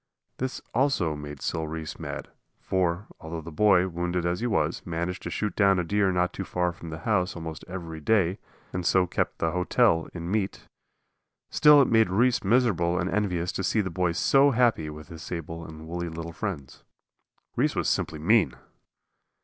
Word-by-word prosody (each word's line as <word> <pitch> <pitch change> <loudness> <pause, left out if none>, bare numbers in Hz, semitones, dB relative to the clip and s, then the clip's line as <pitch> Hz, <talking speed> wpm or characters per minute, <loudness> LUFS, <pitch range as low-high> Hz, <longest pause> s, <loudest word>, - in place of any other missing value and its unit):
This 130 0 -3
also 115 - +1
made 75 -1 -8
Sil 80 -1 -2
Reese 80 -1 -6
mad. - - -6 0.3
For, 90 +1 0
although 80 0 -6
the 85 +2 -9
boy, 95 +1 +4
wounded 85 0 -2
as 85 +1 0
he 120 - -1
was, 80 -8 0
managed 85 +2 -3
to - - -5
shoot 105 -1 -2
down 100 -2 +4
a 90 - +1
deer 100 +2 +1
not 90 0 +1
too - - -4
far 90 -1 -1
from 85 -1 -10
the 80 - -5
house 100 0 0
almost 80 -2 -6
every 85 -3 -6
day, 95 +1 +2 0.3
and 90 - -2
so 90 +3 +3
kept 85 - -2
the 80 - 0
"hotel" 90 0 +2
in 85 0 -5
meat, 100 -2 -2 0.9
still 150 -2 +7
it - - 0
made 110 -3 +4
Reese 120 +6 +2
miserable 95 -6 +2
and - - -1
envious 90 -5 0
to 95 - -3
see 105 +4 +2
the 95 -3 -4
boy 90 0 0
so 135 +10 +4
happy 120 - +2
with 75 +2 -10
his 80 -2 -9
sable 85 0 -6
and 80 0 -10
woolly 85 +1 -3
little 85 +1 -6
friends. 80 -8 -5 0.7
Reese - - +1
was - - 0
simply 80 - 0
mean! 85 - +3
90 Hz, 185 wpm, -27 LUFS, 80-105 Hz, 0.9 s, still